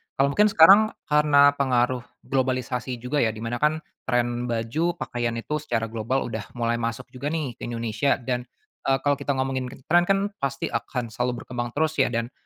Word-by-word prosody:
kalau 140 +1 +2
mungkin 210 +7 +4
sekarang 200 +4 +7 0.2
karena 145 -1 +6
pengaruh 125 -1 +2 0.2
globalisasi 130 -1 -1
juga 145 +4 0
ya 110 -4 +1
di 110 - -7
mana 120 +1 -3
kan 155 +2 +1 0.2
trend 120 -1 0
baju 120 +10 -1
pakaian 120 -8 -3
itu 150 +6 -3
secara 115 -6 -2
global 115 +4 -1
udah 110 -3 -5
mulai 120 0 0
masuk 115 0 -3
juga 130 +2 -5
nih 150 -4 -2
ke - - -5
Indonesia 115 +2 0
dan, 125 -1 -3 0.4
eee, 135 - +4
kalau 145 0 +3
kita 140 0 -1
ngomongin 130 -1 -1 0.2
trend 175 +1 +5
kan 195 - +4 0.2
pasti 140 0 -2
akan 120 -3 -3
selalu 125 +1 -2
berkembang 120 -1 -4
terus 155 +1 +1
ya 135 - +5
dan, 115 +1 -2
130 Hz, 185 wpm, -25 LUFS, 120-145 Hz, 0.4 s, sekarang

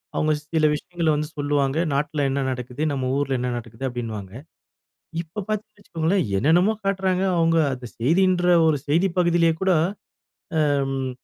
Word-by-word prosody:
அவங்க 155 0 +2 0.2
சில 155 -1 +3
விஷயங்கள 170 +2 -3
வந்து 150 0 -2
சொல்லுவாங்க. 145 0 0 0.2
நாட்டுல 145 +1 0
என்ன 140 +1 -1
நடக்குது? 125 +2 -6
நம்ம 130 -2 -2
ஊருல 135 -2 0
என்ன 125 0 -1
நடக்குது? 115 +1 -9
அப்டின்னுவாங்க. 110 -6 -6 0.9
இப்ப 175 +5 -7
பார்த்தீங்கன்னு 215 0 -4
வச்சுக்கோங்களேன், 170 0 0
என்னென்னமோ 175 - +3
காட்டுறாங்க, 190 -1 +1
அவங்க 165 0 +3 0.2
அந்த 125 -1 -7
செய்தின்ற 175 +8 +2 0.2
ஒரு 150 -2 +3
செய்தி 170 +6 +2
பகுதியிலே 170 -1 +3
கூட 190 0 +3 1.0
அம் 135 -2 0
155 Hz, 140 wpm, -23 LUFS, 135-175 Hz, 1.0 s, சில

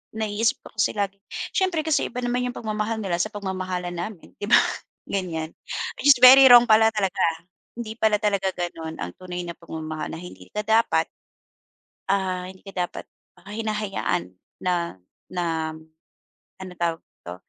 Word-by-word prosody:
naiisip 220 +1 0
ko - - -12
kasi - - +1
lagi 200 -1 -2 0.3
siyempre 370 -5 +1
kasi 315 -2 +1
iba 250 +1 -5
naman 245 +1 0
yung 245 - -5
pagmamahal 215 0 -2
nila 175 -3 -1
sa 200 - +1
pagmamahalan 185 -3 -4
namin, 175 +1 -6
'di 205 - -4
ba? - - +7 0.5
Ganyan. 165 -5 -3 0.5
It - - 0
is 285 - +9
very 265 +1 +11
wrong 245 -1 +10
pala 220 0 +6
talaga. 195 -3 -1 0.6
Hindi 225 -2 -6
pala 220 -1 +4
talaga 200 -2 +1
gano'n 165 -2 -4
ang 90 0 -4
tunay 180 -1 -5
na 170 -1 -6
pagmamahal 155 -1 -6
na - - -7
hindi 180 +1 -11
ka 210 - -3
dapat, 220 -7 +3 1.0
ah 185 -2 0
hindi 190 0 -16
ka 195 - -8
dapat - - -9 0.4
hinahayaan 210 - -2 0.3
na 170 - -1 0.3
na 165 -3 -1 0.9
ano 185 -1 -7
tawag 170 -1 0
dito 85 - -11
195 Hz, 155 wpm, -24 LUFS, 175-220 Hz, 1.0 s, very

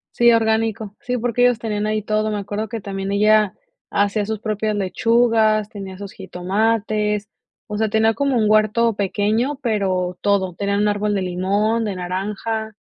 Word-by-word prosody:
Sí, 240 0 +5
orgánico, 220 -2 0
sí, 250 0 -2
porque 245 +1 -1
ellos 245 -2 +4
tenían 215 -2 -2
ahí 215 0 0
todo. 215 +1 0
Me 210 - -1
acuerdo 205 +2 -4
que 225 -1 -5
también 195 0 -4
ella 210 0 +4 0.4
hacía 205 +1 +1
sus 220 -1 -3
propias 215 -1 -2
lechugas, 220 +1 +2
tenía 195 -2 -8
sus 200 -1 -8
jitomates, 210 +3 -1 0.4
o 210 -1 -4
sea, 220 0 +1
tenía 220 +1 +3
como 280 0 0
un 215 -2 +2
huerto 215 +2 +3
pequeño, 210 +7 0
pero 185 -5 0
todo, 195 -3 +1
tenía 200 +2 -1
un 210 0 +2
árbol 205 0 0
de 195 - 0
limón, 200 +5 0
de 200 -3 -3
naranja. 205 +4 -3
210 Hz, 170 wpm, -21 LUFS, 200-220 Hz, 0.4 s, Sí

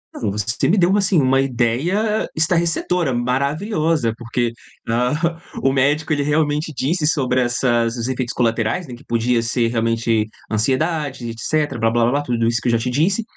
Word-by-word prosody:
Ah, - - -7
não. 105 -4 0
Você 105 +3 -1
me 200 - +3
deu 175 -2 +4
uma, 205 +2 +3
assim, 190 -3 +2
uma 135 0 +3
ideia 135 - 0
estarrecedora, 170 -2 +1
maravilhosa! 140 - 0
Porque, 120 0 -2 0.4
ahá, 150 +9 0 0.2
o 135 - +4
médico 145 +4 +1
ele 145 - 0
realmente 150 +1 0
disse 150 +5 0
sobre 130 -5 +1
essas 120 -1 +1
os 115 - -3
efeitos 130 -2 -2
colaterais, 115 +6 0
né, 125 - -8
que 120 - -16
podia 120 0 +1
ser 115 +1 0
realmente 115 -1 0 0.2
ansiedade 135 +4 -1
e 115 - -3
etcétera, 145 +5 -1
blá 115 0 +2
blá 115 +1 +2
blá, 145 +3 +1
tudo 120 -4 0
isso 115 -1 +1
que - - -3
eu 120 - +3
já 115 - +3
te 115 +2 -2
disse. 180 - +1
130 Hz, 185 wpm, -20 LUFS, 115-155 Hz, 0.4 s, deu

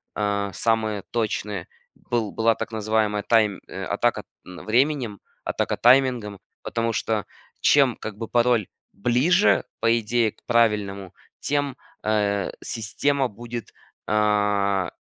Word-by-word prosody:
а, 100 -1 -1
самые 110 -1 0
точные. 105 -4 -2 0.3
Был 115 -4 -2
была 115 0 +2
так 115 - -5
называемая 110 -1 0
тайм, 110 -4 +2
э, - - -6
атака - - 0 0.2
временем, 115 +4 0 0.2
атака - - -1
таймингом, 120 -5 +3 0.2
потому 115 0 -2
что 110 -2 -1 0.4
чем, 135 -5 +4
как 110 -2 -7
бы 115 0 -5
пароль 120 -3 +2 0.3
ближе, 130 - +3 0.2
по 115 +1 +3
идее, 115 0 +1
к - - -30
правильному, 105 -5 +1 0.3
тем, 145 -2 -1 0.3
э, 105 -2 0
система 130 +5 0
будет, 120 +1 -8 0.3
а, 105 -3 +1
110 Hz, 115 wpm, -24 LUFS, 105-120 Hz, 0.4 s, чем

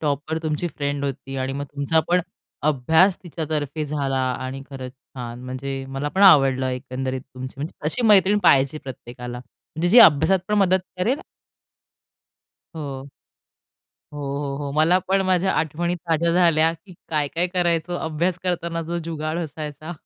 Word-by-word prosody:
Topper 150 +1 -1
तुमची 155 +2 -1
friend 145 -1 -2
होती 135 0 -5
आणि 130 0 -2
मग 140 +1 -3
तुमचा 145 +3 0
पण 180 +1 +4 0.5
अभ्यास 160 +7 +4
तिच्यातर्फे 155 -3 -3
झाला 140 -2 -1 0.3
आणि 135 +1 -5
खरंच 130 -2 -7
छान 125 -2 -9
म्हणजे 135 +1 -4
मला 135 +2 -3
पण 190 +6 0
आवडलं 135 -8 +6
एकंदरीत 130 0 -4
तुमची 130 +1 -7
म्हणजे 150 +4 -5
अशी 160 +10 -1
मैत्रीण 205 0 +6
पाहिजे 140 +2 +4
प्रत्येकाला 125 -1 -8
म्हणजे 160 +6 -5
जी 230 +7 +7
अभ्यासात 190 -1 +7
पण 210 - +1
मदत 190 -1 +4 0.2
करेल 240 +10 +1 1.6
हो. 140 -3 -6 1.0
हो, 145 - -7 0.3
हो, 140 - -4
हो, 145 -1 -4
मला 160 +5 +4
पण 195 0 +3
माझ्या 185 0 +2
आठवणी 165 +3 -1
ताज्या 170 -1 0
झाल्या, 165 -2 +4
की 170 +3 -14
काय 150 -2 0
काय 170 +5 0
करायचो 175 -1 0
अभ्यास 165 +3 -1
करताना, 170 -2 -2
जो 170 +1 -3
जुगाड 160 0 -3
असायचा. 155 0 -6
155 Hz, 150 wpm, -23 LUFS, 135-175 Hz, 1.6 s, जी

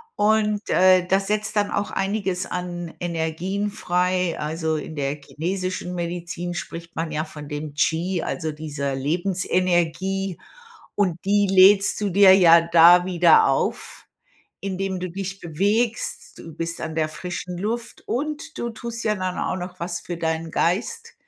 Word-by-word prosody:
Und, 210 0 +1
äh, 185 -1 +5
das 195 +1 +1
setzt 210 +1 -1
dann 205 -1 +1
auch 205 - -2
einiges 195 -2 -1
an 175 -2 -5
Energien 175 +4 -2
frei. 180 -3 0
Also, 160 +1 -2
in 155 +1 -7
der 140 -1 -1
chinesischen 185 +4 -4
Medizin 175 0 -4
spricht 170 0 -7
man 165 0 -3
ja 155 0 -1
von 150 -2 -10
dem 150 0 -6
Chi, 170 +3 0
also 160 -3 -3
dieser 145 -3 -4
Lebensenergie, 180 +3 0 0.6
und 185 -5 0
die 205 0 +2
lädst 195 +2 +6
du 205 - 0
dir 195 +1 +7
ja 170 -3 +7
da 170 +1 +6
wieder 175 -3 +5
auf, 135 - -2 0.6
indem 190 -1 -3
du 185 -1 -5
dich 195 +1 -5
bewegst. 205 +8 -1
Du 165 -2 -10
bist 165 0 -4
an 155 0 -5
der 155 -1 +1
frischen 180 +3 -6
Luft, 230 +4 -4
und 295 +4 -4
du 235 - -3
tust 235 +1 -6
ja 215 - +2
dann 185 -2 -3
auch - - -2
noch 180 0 -7
was 170 0 -3
für 175 - -6
deinen 160 0 -2
Geist 450 - -1
180 Hz, 150 wpm, -23 LUFS, 165-195 Hz, 0.6 s, dir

